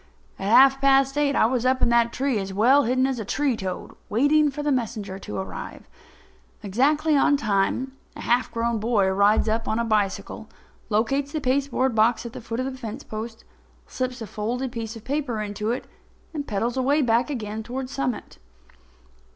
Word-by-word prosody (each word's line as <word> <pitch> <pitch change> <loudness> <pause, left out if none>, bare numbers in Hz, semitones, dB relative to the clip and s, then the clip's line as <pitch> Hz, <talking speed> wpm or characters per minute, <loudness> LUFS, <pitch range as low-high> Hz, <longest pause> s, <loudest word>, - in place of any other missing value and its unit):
At 195 - -2
half 270 +3 +6
past 275 0 +4
eight 290 -1 +1
I - - +4
was 240 +1 0
up 255 0 +2
in - - +2
that 235 0 +3
tree 265 -3 0
as 195 0 -4
well 250 +9 +4
hidden 255 +2 +2
as 265 -2 -1
a - - -3
tree 270 +5 0
toad, 190 -3 -5 0.2
waiting 290 +7 +3
for 295 +1 -5
the 295 - +1
messenger 215 -6 -2
to - - -6
arrive. 190 - -7 0.8
Exactly 295 +9 +2
on 285 +1 +4
time, 215 +2 0 0.2
a - - -8
half 245 +1 +1
grown 230 0 -1
boy 210 -3 +2
rides 200 +3 +3
up 225 +1 0
the - - -4
road - - +1
on - - -1
a - - -5
bicycle, 205 -3 -1 0.4
locates 270 +7 0
the 310 - -1
pasteboard 265 -1 0
box 225 +1 +2
at 235 - -7
the 255 - -8
foot 230 +1 -5
of 255 - -1
the 260 -1 -5
fence 220 -3 -6
post, 225 +1 -7 0.4
slips 255 -2 -4
a - - -5
folded 240 +6 -3
piece 230 -1 -5
of 225 - -10
paper 270 -4 -2
into 210 +1 -3
it 245 - -2 0.5
and 290 -2 -4
pedals 230 +3 -1
away 265 +3 +2
again 240 -1 +2 0.3
back - - -5
toward 255 +3 -5
Summit. 260 -3 -4
240 Hz, 195 wpm, -24 LUFS, 220-270 Hz, 0.8 s, half